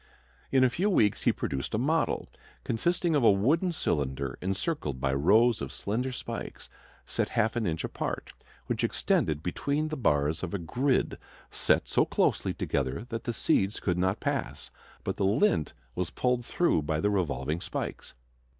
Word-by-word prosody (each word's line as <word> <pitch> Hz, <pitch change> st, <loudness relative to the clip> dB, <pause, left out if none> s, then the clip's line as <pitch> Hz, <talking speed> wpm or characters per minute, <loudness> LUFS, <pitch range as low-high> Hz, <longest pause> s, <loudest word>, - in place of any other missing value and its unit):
In 130 Hz, -1 st, +5 dB
a 130 Hz, -, +5 dB
few 195 Hz, +9 st, +1 dB
weeks 105 Hz, -, +2 dB
he -, -, +6 dB
produced 65 Hz, +8 st, -3 dB
a -, -, +1 dB
model, 155 Hz, +7 st, +1 dB, 0.4 s
consisting 170 Hz, +8 st, 0 dB
of 140 Hz, -, +3 dB
a -, -, +7 dB
wooden 145 Hz, -, +2 dB
cylinder 70 Hz, -, -1 dB
encircled 95 Hz, -, -2 dB
by 65 Hz, 0 st, 0 dB
rows 110 Hz, -, +4 dB
of 70 Hz, -, -4 dB
slender 125 Hz, +6 st, -2 dB
spikes 125 Hz, -, -6 dB, 0.3 s
set -, -, -1 dB
half 110 Hz, +2 st, +1 dB
an 115 Hz, -4 st, 0 dB
inch 80 Hz, -1 st, -2 dB
apart, -, -, -4 dB, 0.3 s
which -, -, -2 dB
extended 75 Hz, 0 st, +1 dB
between 145 Hz, -, -1 dB
the 155 Hz, -, -3 dB
bars 75 Hz, -, +1 dB
of 95 Hz, +1 st, -3 dB
a -, -, +1 dB
grid 125 Hz, -, 0 dB, 0.3 s
set -, -, +2 dB
so -, -, +3 dB
closely -, -, +1 dB
together 70 Hz, -, -2 dB
that 115 Hz, -1 st, -4 dB
the 120 Hz, -, -1 dB
seeds 100 Hz, -1 st, +1 dB
could 90 Hz, -2 st, 0 dB
not 95 Hz, +2 st, +1 dB
pass, -, -, -3 dB, 0.3 s
but 95 Hz, -, -3 dB
the 100 Hz, -, 0 dB
lint 100 Hz, -, +2 dB, 0.2 s
was 90 Hz, -1 st, -2 dB
pulled 125 Hz, -1 st, 0 dB
through 170 Hz, -, +2 dB
by 75 Hz, +1 st, -1 dB
the 105 Hz, +6 st, +1 dB
revolving 80 Hz, -4 st, -1 dB
spikes. -, -, -5 dB
100 Hz, 170 wpm, -29 LUFS, 80-125 Hz, 0.4 s, a